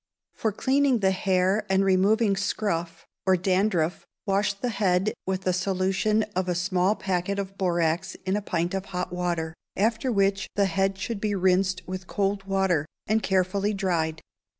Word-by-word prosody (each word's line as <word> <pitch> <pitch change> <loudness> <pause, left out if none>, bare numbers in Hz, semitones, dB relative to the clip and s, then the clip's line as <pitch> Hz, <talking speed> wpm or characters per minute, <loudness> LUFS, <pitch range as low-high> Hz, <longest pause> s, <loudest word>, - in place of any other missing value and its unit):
For 220 - -1
cleaning 265 +2 +2
the 190 -1 +3
hair 190 +2 +1
and 190 0 +3
removing 200 +3 +3
scurf 195 -4 -2 0.2
or 190 -1 +5
dandruff 185 -2 0 0.2
wash 200 0 +1
the 245 +5 -3
head 195 -2 +1
with 190 0 -2
a 185 - +2
solution 195 +3 +1
of 185 0 0
a 180 - 0
small 185 +2 +1
packet 190 0 -2
of 195 -1 -4
borax 175 -1 0
in 190 +1 +1
a 210 - 0
pint 175 -2 -1
of 195 0 -2
hot 180 -1 -4
water, 170 -3 -2 0.2
after 225 +5 +1
which 195 -2 +1
the 200 - +3
head 195 +1 0
should 200 +2 -4
be 210 -1 0
rinsed 185 0 +2
with 185 0 -6
cold 195 0 -1
water, 190 -6 +1 0.2
and 220 +1 +1
carefully 195 +2 +1
dried. 165 -5 -1
190 Hz, 165 wpm, -26 LUFS, 180-200 Hz, 0.2 s, or